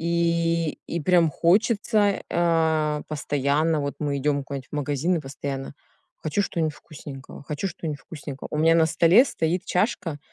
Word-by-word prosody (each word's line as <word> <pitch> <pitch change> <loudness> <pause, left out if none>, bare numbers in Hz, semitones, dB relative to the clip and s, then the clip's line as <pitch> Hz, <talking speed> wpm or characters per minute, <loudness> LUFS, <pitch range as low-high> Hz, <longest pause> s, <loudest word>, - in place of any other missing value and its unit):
И 170 -1 0
и 170 - -3
прям 170 +1 +4
хочется, 205 - +2
а, 160 -3 +1
постоянно 150 +1 0
Вот 140 0 -3
мы 145 -2 -1
идем 140 0 0
куда-нибудь 135 -1 -7
в - - -8
магазин, 145 +5 0
и - - -2
постоянно: 135 0 -6 0.4
"Хочу 155 +6 -1
что-нибудь 160 -5 -1
вкусненького, 140 -2 -11
хочу 150 +6 -4
что-нибудь 155 -4 -5
вкусненького". 140 -2 -8
У 150 - -2
меня 165 +1 +5
на 160 -1 +5
столе 170 - +5
стоит 175 - -1
чашка, 180 -5 -1
160 Hz, 150 wpm, -24 LUFS, 145-170 Hz, 0.4 s, меня